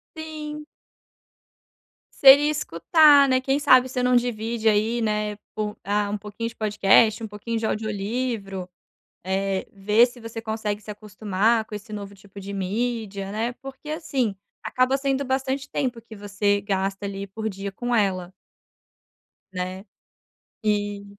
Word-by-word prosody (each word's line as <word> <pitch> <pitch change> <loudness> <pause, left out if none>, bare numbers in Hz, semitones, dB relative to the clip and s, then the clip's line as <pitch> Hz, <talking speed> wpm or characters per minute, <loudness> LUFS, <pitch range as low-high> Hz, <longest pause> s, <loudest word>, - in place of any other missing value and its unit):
Sim. 305 -1 -7 1.5
Seria 280 +2 +8
escutar, 290 - +5
né, 255 0 +3
quem 270 +2 0
sabe 255 -3 +6
você 255 0 -2
não 250 0 +3
divide 230 -1 0
aí, 220 +2 +2
né, 210 -1 -1 0.2
po 210 0 -3
ah, 205 +1 0
um 210 - -2
pouquinho 210 +3 -5
de - - -15
podcast, 215 +1 +3
um - - -3
pouquinho 220 +2 -4
de 220 - -2
audiolivro, 215 -2 -3 0.6
Eh, 190 0 -1
ver 210 +4 +4
se 245 0 -10
você 230 0 -7
consegue 220 -2 -3
se 210 - -8
acostumar 210 +2 0
com 215 - -13
esse 210 +2 -8
novo 200 -1 -6
tipo 200 0 -13
de 200 +1 -7
mídia, 200 0 -3
né? 230 +3 -2
Porque, 270 +3 -11
assim, 275 - -1 0.3
acaba 255 +2 +1
sendo 275 0 -1
bastante 265 +1 -1
tempo 250 -5 -2
que 225 -1 -13
você 205 0 0
gasta 195 0 -2
ali 195 0 -5
por 220 +3 -4
dia 195 0 -6
com 240 +4 -2
ela 185 -4 0 1.2
né? 185 +2 -5 0.8
E 205 -1 0
215 Hz, 145 wpm, -24 LUFS, 200-250 Hz, 1.5 s, Seria